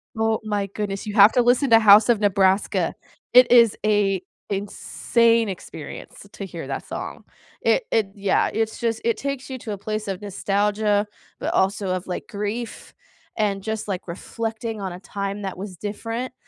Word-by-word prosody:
Oh 225 0 +1
my 205 -2 -1
goodness, 200 0 -4
you 205 - -4
have 205 +1 +8
to 245 - +4
listen 245 +3 +3
to 225 - +8
House 210 +1 +7
of 230 -3 +4
Nebraska. 195 -1 +2 0.4
It 250 -1 +7
is 235 -3 +6
a 200 -3 +2 0.3
insane 230 +3 +1
experience 185 - -9
to - - -7
hear - - -7
that - - -4
song. - - -6 0.4
It - - +2
it 215 -3 +2
yeah, 200 -1 +1
it's 220 0 -1
just 230 -1 -1
it 230 -1 +1
takes 275 -1 -4
you 260 - -5
to 220 - -6
a - - -5
place 215 +1 -4
of 195 0 -4
nostalgia, 205 +1 0 0.3
but - - -2
also 190 0 +1
of, 185 0 -2
like, 180 - -5
grief, 215 +2 -5 0.4
and 200 -2 0
just, 220 +1 -4
like, 190 -2 -4
reflecting 225 +4 -5
on 190 -2 -4
a 180 - -9
time 200 +1 -5
that 190 -2 -4
was 190 -2 -7
different, 225 +5 -4
210 Hz, 175 wpm, -23 LUFS, 195-225 Hz, 0.4 s, have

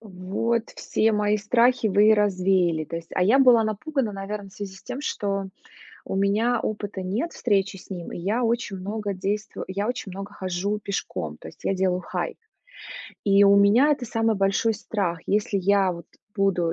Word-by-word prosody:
Вот 215 +3 -2
все 220 0 +1
мои 210 0 +2
страхи 235 +3 +2
вы 205 +1 +4
и 220 - +8
развеяли, 185 -5 +2
то 165 - -6
есть. 165 0 -9
А 180 - +2
я 220 +9 +5
была 250 -4 +6
напугана, 230 +3 -2
наверно, 200 +1 -5
в - - -19
связи 195 -1 -7
с - - -16
тем, 250 +2 -6
что 200 -8 -2 0.6
у - - -4
меня 215 +5 +2
опыта 205 -2 -4
нет 210 - -2
встречи 195 -4 0
с - - -16
ним, 180 -3 -6
и - - -5
я 205 +8 -1
очень 230 -4 -1
много 205 +2 -4
действо 205 +3 -3
я 200 +3 -2
очень 245 -6 -4
много 195 +2 -7
хожу 190 +2 -2
пешком, 135 - -4
то 80 - -10
есть - - -17
я 195 - +2
делаю 185 -1 +1
хайк. - - -4 0.9
И 200 0 +5
у 200 0 +6
меня 215 +9 +5
это 265 -3 -3
самый 225 -1 +1
большой 195 +3 +1
страх, 190 -5 -2
если 205 0 +1
я 195 -1 +3
вот 170 0 -10 0.3
буду 180 -4 +1
200 Hz, 185 wpm, -24 LUFS, 190-220 Hz, 0.9 s, и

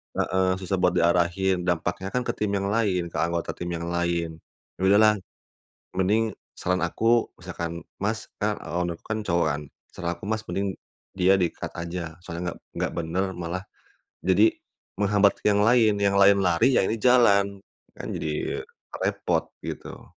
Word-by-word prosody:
heeh, 95 0 +1
susah 95 0 -2
buat 90 0 +3
diarahin, 90 +2 +2
dampaknya 90 +2 -1
kan 125 - +1
ke - - -1
tim 105 - -2
yang 100 0 -1
lain, 95 -6 0
ke - - -5
anggota 85 0 0
tim 85 - -6
yang 85 0 -4
lain. 85 -2 -1 0.4
Ya - - -7
udahlah, 105 +2 +6 0.8
mending 105 +4 +1 0.2
saran 90 0 0
aku 115 +7 +2
misalkan, 85 0 -5 0.2
"Mas" 110 +2 -1 0.2
kan 105 0 0
owner 85 0 -3
ku - - -20
kan 110 0 -2
cowok 85 -4 +1
kan, 75 - -6 0.3
"saran 85 0 -2
aku - - -30
Mas 110 0 -1
mending 95 -1 -1 0.4
dia 95 +1 +4
di-cut 85 -3 -2
aja, 85 -1 -6
soalnya 90 0 -4
nggak - - -11 0.2
nggak - - -1
benar 85 +3 -1
malah 85 +2 -3 0.6
jadi 95 +4 +4 0.5
menghambat 100 0 +3
ke - - -1
yang 100 - +3
lain, 115 -2 +5
yang 100 0 +3
lain 100 0 +6
lari 90 +9 +3
ya - - +4
ini 110 +4 -1
jalan, 100 -5 +4 0.4
kan - - -7
jadi 75 -1 -3 0.4
repot" - - 0 0.2
gitu. - - -7
95 Hz, 165 wpm, -25 LUFS, 85-105 Hz, 0.8 s, udahlah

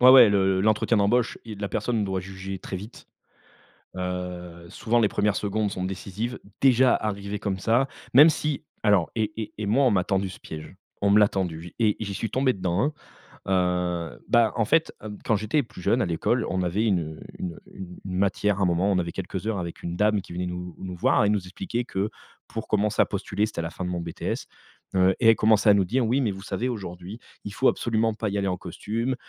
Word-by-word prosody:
Ouais 125 +1 +9
ouais, 130 -4 +10
le 95 -2 +2
l'entretien 110 +2 +2
d'embauche, 115 +4 +2
il 110 -3 -7
la 100 - -2
personne 115 -1 -1
doit 95 -1 -2
juger 95 0 -7
très 95 - -6
vite. 105 +6 -10 0.9
Heu, 90 -2 -5
souvent 120 +6 0
les 110 - +4
1res 105 0 +1
secondes 105 0 -1
sont 90 - -4
décisives, 100 +5 -4 0.2
déjà 130 -1 +5
arrivé 100 -1 -3
comme 100 -2 -2
ça. 115 +7 +2 0.3
Même 145 +6 +9
si 150 -2 -2 0.2
alors 100 -6 +3
et 110 -2 0
et 110 - -6
et 105 - -3
moi 125 +7 +3
on 125 - +4
m'a 95 -3 +2
tendu 95 0 0
ce 90 - -10
piège, 80 +4 -9 0.3
on 100 - +3
me 100 - +6
l'a 105 - +6
tendu 90 -5 -2
j 90 - -11
et 110 -3 +3
j'y 100 -2 -4
suis 110 +3 -3
tombé 130 +3 +2
dedans, 95 -1 -1
hein. 145 +4 +1 1.2
Heu, - - -15
bah 115 -3 +4
en 115 - +1
fait, 165 +7 +2
heu, 105 -1 -6
quand 110 - +2
j'étais 110 +8 +1
plus 115 - -12
jeune 120 +7 +2
à - - +2
l'école, 85 -2 0
on 95 0 0
avait 95 +6 0
une, 100 -5 +3
heu, 80 -1 -7 0.2
une, 90 -2 -4
heu, - - -15
une 90 -2 -10
une 90 -1 -3
matière 100 +1 +1
à - - +2
un - - +4
moment, 90 +3 +2
on 95 - +2
avait 85 -1 -2
quelques 95 +1 -5
heures 110 -3 -1
avec 85 -1 -6
une 85 0 -3
dame 105 +1 +2
qui 90 - -11
venait 90 +1 -2
nous 90 0 -6
nous 90 -1 -6
voir 90 - +3
et - - +3
nous 105 -1 +1
expliquer 95 +6 -4
que 100 -2 -2 0.4
pour 110 - -6
commencer 105 0 +2
à - - +5
postuler 100 +1 -1
c'était 110 - -6
à - - +1
la 80 - -3
fin 90 +2 -6
de - - -2
mon 90 -1 -2
BTS, 85 -1 -4 0.5
heu 95 0 +4
et 115 - +4
elle 115 - +7
commençait 110 0 +4
à 105 - +8
nous 100 -2 +3
dire: 120 +7 +1
«Oui, 125 +5 +2
mais 115 -6 +1
vous 95 0 -8
savez 120 +3 -2
aujourd'hui, 95 -2 -6 0.3
il 100 - -5
faut 130 - +2
absolument 115 -1 0
pas 110 0 -3
y 100 - -2
aller 100 - 0
en 90 -1 -1
costume, 110 +8 -3
100 Hz, 240 wpm, -25 LUFS, 90-110 Hz, 1.2 s, ouais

